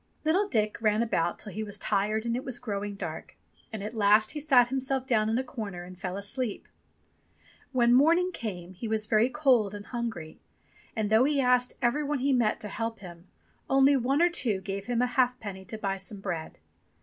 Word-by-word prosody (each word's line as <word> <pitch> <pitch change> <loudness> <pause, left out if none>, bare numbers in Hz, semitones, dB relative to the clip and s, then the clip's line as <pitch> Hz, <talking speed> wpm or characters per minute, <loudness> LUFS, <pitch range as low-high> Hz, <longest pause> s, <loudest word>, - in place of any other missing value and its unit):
Little 370 +6 +2
Dick 215 - 0
ran 215 0 +2
about 170 -7 0
till 210 - -8
he 215 - -5
was 205 -1 -2
tired 210 +2 0
and 235 0 0
it 255 - -3
was 255 -3 -3
growing 205 -3 -4
dark. - - -7 0.3
And 215 -3 -5
at 215 +2 -5
last 215 0 +4
he 300 - -4
sat 260 -5 +4
himself 265 0 -1
down 220 -4 +2
in 225 - +1
a 260 - 0
corner 210 -9 -6
and 180 +1 -10
fell 180 +1 -5
asleep. 210 +3 -3 1.0
When 240 -2 +3
morning 335 +8 +4
came 185 - -6
he 205 +6 -6
was 215 -1 0
very 215 +3 +3
cold 255 -9 +2
and 205 0 -8
hungry, 225 -10 -5 0.6
and 215 -2 -1
though 220 +4 +5
he 290 0 +1
asked 250 -1 +3
every 245 +5 +2
one 295 0 -1
he 270 +1 +1
met 235 -4 +2
to 210 - -4
help 225 +2 -4
him, 175 -2 -12 0.4
only 270 +1 +5
one 270 +5 +2
or 350 - +5
two 225 - 0
gave 195 +1 -5
him 245 0 +1
a - - +4
halfpenny 245 -6 -1
to 220 - -6
buy 195 -2 -2
some 195 +2 -7
bread. 175 -5 -5
225 Hz, 205 wpm, -28 LUFS, 205-255 Hz, 1.0 s, though